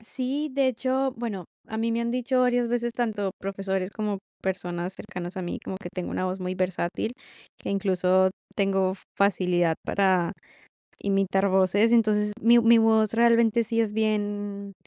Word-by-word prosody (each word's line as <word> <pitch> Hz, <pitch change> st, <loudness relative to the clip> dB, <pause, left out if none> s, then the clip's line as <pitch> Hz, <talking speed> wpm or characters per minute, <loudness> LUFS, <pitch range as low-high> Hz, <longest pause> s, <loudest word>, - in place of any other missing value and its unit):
Sí, 265 Hz, +6 st, -3 dB
de 270 Hz, 0 st, +2 dB
hecho, 260 Hz, +2 st, 0 dB
bueno, 220 Hz, -6 st, -4 dB, 0.2 s
a 220 Hz, -, -5 dB
mí 230 Hz, +1 st, 0 dB
me 230 Hz, -, 0 dB
han 235 Hz, 0 st, -1 dB
dicho 255 Hz, +1 st, 0 dB
varias 245 Hz, -1 st, +2 dB
veces 240 Hz, 0 st, -1 dB
tanto 215 Hz, -5 st, -1 dB
profesores 195 Hz, -1 st, -3 dB
como 210 Hz, -2 st, -3 dB, 0.2 s
personas 180 Hz, -1 st, -3 dB
cercanas 190 Hz, -2 st, -7 dB
a 185 Hz, -, -3 dB
mí 175 Hz, -, -4 dB
como 190 Hz, -, -6 dB
que 180 Hz, -, -6 dB
tengo 180 Hz, -2 st, -4 dB
una -, -, -2 dB
voz 185 Hz, +1 st, -3 dB
muy 185 Hz, 0 st, -3 dB
versátil. 185 Hz, +3 st, -2 dB, 0.5 s
Que -, -, -5 dB
incluso 190 Hz, -1 st, +2 dB, 0.3 s
tengo 195 Hz, -2 st, +1 dB, 0.2 s
facilidad 180 Hz, -4 st, +2 dB
para 185 Hz, -3 st, +2 dB, 0.7 s
imitar 195 Hz, 0 st, +1 dB
voces. 190 Hz, +4 st, +3 dB
Entonces, 210 Hz, -2 st, +3 dB
mi 235 Hz, +1 st, +6 dB
mi 230 Hz, 0 st, +6 dB
voz 220 Hz, -1 st, +3 dB
realmente 235 Hz, 0 st, +4 dB
sí 230 Hz, +1 st, 0 dB
es 220 Hz, -2 st, 0 dB
bien, 205 Hz, -2 st, -2 dB
205 Hz, 160 wpm, -26 LUFS, 190-230 Hz, 0.7 s, mi